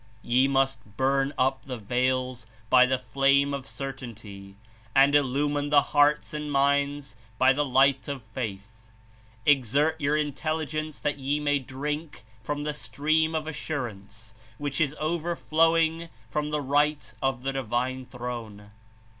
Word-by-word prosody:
"Ye 125 +3 +3
must 135 -6 -1
burn 135 +1 +2
up 130 +1 +1
the 130 -2 -5
veils 125 +2 -1 0.2
by 125 0 +7
the 130 0 +1
flame 140 +2 +2
of 135 -1 -5
cer 135 0 -5
tainty 105 -6 -10 0.4
and 140 +1 +6
illumine 145 +1 +1
the 145 -1 +5
hearts 145 +1 +3
and 150 -1 -4
minds 140 -1 +1 0.2
by 130 +2 +5
the 145 +2 +1
light 135 -1 +3
of 140 -4 -5
faith. 110 -1 -7 0.6
Exert 145 +4 +2
your 145 +1 +2
intelligence 155 +1 -2
that 145 -1 -1
ye 140 +2 0
may 145 -1 +1
drink 145 -1 -5 0.2
from 145 +5 -3
the 150 0 -2
stream 155 +2 0
of 155 -1 -1
assurance 115 -8 -6 0.2
which 145 -1 -3
Is 150 -1 +1
overflowing 165 0 +1 0.2
from 150 0 -1
the 150 0 -1
right 145 +2 +1
of 135 -2 -1
the 135 0 -1
Divine 130 0 -2
Throne. 115 -5 -7
140 Hz, 140 wpm, -27 LUFS, 125-150 Hz, 0.6 s, by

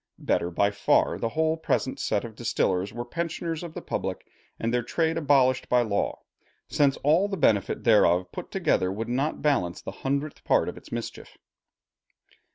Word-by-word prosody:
Better 85 - 0
by 100 +4 +1
far 100 - +2
the 115 - -1
whole 160 +5 +1
present 135 -4 -1
set - - 0
of 115 - -8
distillers 100 -4 0
were 120 +2 -5
pensioners 165 +3 -3
of 170 -2 -8
the - - -6
public, - - -4 0.3
and 115 +1 -1
their 125 - +2
trade 160 +7 0
abolished 135 -5 +2
by 125 -1 +4
law; 100 -3 -2 0.4
since 140 -2 +2
all 160 +8 +4
the 195 -1 -4
benefit 105 - +1
thereof 90 -5 +4
put - - -7
together 90 - +1
would 115 +4 -4
not 135 +5 -1
balance 115 - +1
the - - -7
hundredth 140 +2 -2
part - - +2
of - - -4
its - - -14
mischief. - - -6
125 Hz, 170 wpm, -26 LUFS, 105-155 Hz, 0.4 s, by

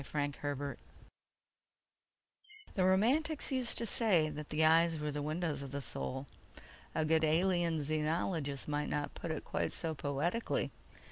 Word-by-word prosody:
_The 145 0 -3 2.0
Romantics 240 +13 +3
used 255 -3 0
to 230 - +2
say 195 -8 +3
that 150 0 -7
the 155 +1 +3
eyes 165 +1 +5
were 150 0 -2
the 145 0 -3
windows 155 -1 -1
of 140 - -5
the 140 +2 -3
Soul. 130 0 -3 0.7
A 160 - +1
good 160 0 +3
Alien 170 +1 +2
Xenologist 155 -1 -1
might 150 0 -1
not 145 -1 -2
put 170 - -6
it 160 - -3
quite - - -1
so 165 -2 -2
poetically 150 +10 -1
155 Hz, 135 wpm, -34 LUFS, 145-175 Hz, 2.0 s, eyes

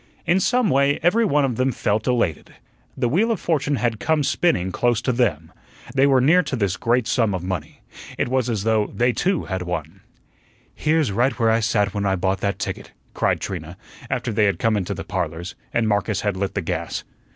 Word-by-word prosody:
In 180 +2 +3
some 245 +1 +2
way 140 +1 +3
every 205 +7 +4
one 150 -7 +2
of 125 -4 -2
them 130 +1 +2
felt 105 -2 -1
elated. 115 - -1 0.4
The 120 - +1
wheel 195 - +2
of 220 - -1
fortune 150 -3 0
had 120 -4 -1
come 155 +3 +1
spinning 95 - +1
close 120 +4 +1
to 125 - +1
them. 95 - 0 0.4
They 135 +1 +4
were 135 -2 +4
near 160 +8 +5
to 140 -5 -3
this 100 -6 0
great 120 0 +1
sum 110 -4 +1
of 90 - -4
money. 90 -5 -5 0.4
It - - 0
was 130 -1 0
as 110 -4 -1
though 110 -1 +2
they 120 +1 +1
too 185 +3 0
had 95 -1 -4
won. 90 0 -5 0.7
"Here's 155 -6 +1
right 120 +5 +1
where 115 -1 +3
I 115 - +3
sat 105 -3 +1
when 100 -1 -1
I 95 - +2
bought 95 +1 0
that 100 -1 -1
ticket," - - -5 0.2
cried - - +1
Trina, - - -6 0.3
after - - -2
they 105 0 +3
had 100 -4 +1
come 115 +4 +1
into 95 -4 -2
the - - -6
"Parlors," 85 +3 -4 0.2
and 115 -1 +1
Marcus 105 -1 0
had 105 -2 -1
lit 95 +1 -3
the 100 - 0
gas. 85 -1 -3
115 Hz, 210 wpm, -22 LUFS, 95-135 Hz, 0.7 s, near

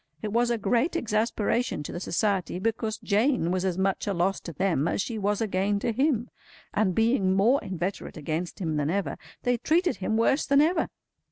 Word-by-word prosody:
It 210 -1 -3
was 240 +1 +2
a 235 - +1
great 240 - +1
exasperation 225 - 0
to - - -6
the - - -5
Society, 185 -1 0
because 220 +2 -1
Jane 215 - +2
was 185 0 0
as 185 -2 -1
much 190 +1 0
a 200 - 0
loss 185 +3 +1
to 170 - -8
them 165 -2 0
as - - -1
she 220 +2 -2
was 205 +1 0
a 225 - +1
gain 195 +1 0
to 215 - -1
him; 245 -1 0 0.4
and 195 -4 +1
being 225 -5 +2
more 230 +8 +4
inveterate 185 0 -4
against 160 +3 -3
him 160 -5 -2
than 145 0 0
ever, 195 +3 -1 0.3
they 245 0 +2
treated 340 +8 +1
him 220 +3 -1
worse 265 +5 +3
than 280 0 +4
ever. 325 +5 +2
205 Hz, 200 wpm, -27 LUFS, 185-235 Hz, 0.4 s, more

